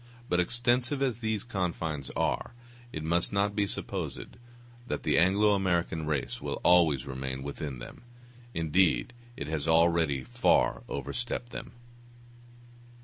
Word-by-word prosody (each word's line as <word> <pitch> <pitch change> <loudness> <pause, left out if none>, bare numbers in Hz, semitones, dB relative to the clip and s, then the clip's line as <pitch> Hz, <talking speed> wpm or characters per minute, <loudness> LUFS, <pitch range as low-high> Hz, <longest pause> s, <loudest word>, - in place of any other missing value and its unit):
But 90 - +2
extensive 120 +7 +1
as 125 -4 0
these 110 -3 -1
confines 85 - -3
are, 120 - -1 0.4
it 80 - -5
must 85 +2 +1
not 100 0 +1
be 100 -2 +1
supposed - - -5 0.5
that - - -3
the - - +3
Anglo 100 +4 +4
American 85 -5 0
race 70 -5 -2
will - - -3
always 80 -7 +5
remain 65 0 -4
within 70 -1 -5
them; - - -10 0.5
indeed, 85 +6 +2 0.2
it 70 - -4
has 80 0 -3
already 80 -4 +3
far - - +2
overstepped 120 0 -3
them. - - -7
85 Hz, 130 wpm, -29 LUFS, 75-105 Hz, 0.5 s, always